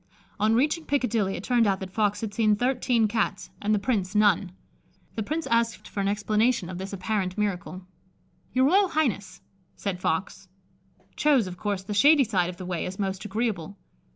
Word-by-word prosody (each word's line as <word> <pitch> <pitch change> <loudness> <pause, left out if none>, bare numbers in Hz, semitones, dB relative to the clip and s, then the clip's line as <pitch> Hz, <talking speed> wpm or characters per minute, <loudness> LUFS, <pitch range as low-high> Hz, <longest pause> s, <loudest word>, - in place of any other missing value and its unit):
On 215 +2 +3
reaching 300 +6 +1
Piccadilly, 230 -8 0
it - - -6
turned 240 -2 +3
out 195 -1 +1
that 190 -1 -7
Fox 210 -1 +1
had 215 -2 -4
seen 215 -1 +3
thirteen 245 -1 +1
Cats 210 -2 -2
and 210 - 0
the 215 - +4
Prince 200 -3 -1
none. 205 -3 +3 0.6
The 225 - -3
Prince 310 +9 -3
asked 230 -3 0
for - - -6
an 195 - +1
explanation 210 0 +1
of 180 - -6
this 190 +1 -6
apparent 195 -1 -2
miracle. 185 -3 -3 0.7
"Your 260 +1 +3
Royal 385 +7 +4
Highness," 225 - -1 0.3
said 195 -3 -4
Fox, 180 +3 -2 0.7
"chose, 285 -7 +3
of 180 -1 -7
course, 200 -2 -2
the 210 - -5
shady 285 +7 +6
side 190 -7 0
of 180 - -8
the 185 - -7
way 180 -2 -3
as 185 +1 -7
most 195 0 -3
agreeable. 205 -3 -3
210 Hz, 180 wpm, -26 LUFS, 190-235 Hz, 0.7 s, shady